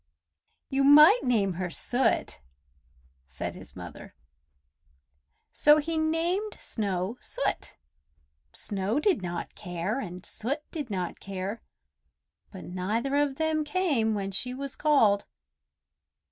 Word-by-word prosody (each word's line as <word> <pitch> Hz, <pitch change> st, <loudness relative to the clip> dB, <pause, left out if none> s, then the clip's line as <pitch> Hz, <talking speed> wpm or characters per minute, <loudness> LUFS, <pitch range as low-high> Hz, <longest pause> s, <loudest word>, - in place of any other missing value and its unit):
"You 275 Hz, 0 st, +2 dB
might 300 Hz, -, +8 dB
name 210 Hz, -6 st, +2 dB
her 180 Hz, -, -1 dB
Soot!" 250 Hz, +8 st, 0 dB, 0.9 s
said -, -, -5 dB
his -, -, -11 dB
mother. -, -, -10 dB, 1.4 s
So 295 Hz, +1 st, +6 dB
he 320 Hz, +2 st, -1 dB
named 335 Hz, +6 st, 0 dB
Snow 200 Hz, +1 st, -2 dB
Soot. -, -, -2 dB, 0.8 s
Snow 200 Hz, -, -1 dB
did 365 Hz, -, +2 dB
not 175 Hz, -1 st, -4 dB
care, 180 Hz, +5 st, -3 dB
and 180 Hz, -5 st, -7 dB
Soot 275 Hz, +7 st, -3 dB
did 295 Hz, -6 st, -5 dB
not 185 Hz, -3 st, -3 dB
care, 195 Hz, +3 st, -5 dB, 0.9 s
but -, -, -9 dB
neither 210 Hz, +10 st, -2 dB
of 290 Hz, -2 st, +1 dB
them 315 Hz, 0 st, 0 dB
came 295 Hz, -, +1 dB
when 195 Hz, -1 st, -3 dB
she 250 Hz, +6 st, -3 dB
was 275 Hz, 0 st, -5 dB
called. 225 Hz, -10 st, +3 dB
245 Hz, 115 wpm, -28 LUFS, 195-300 Hz, 1.4 s, might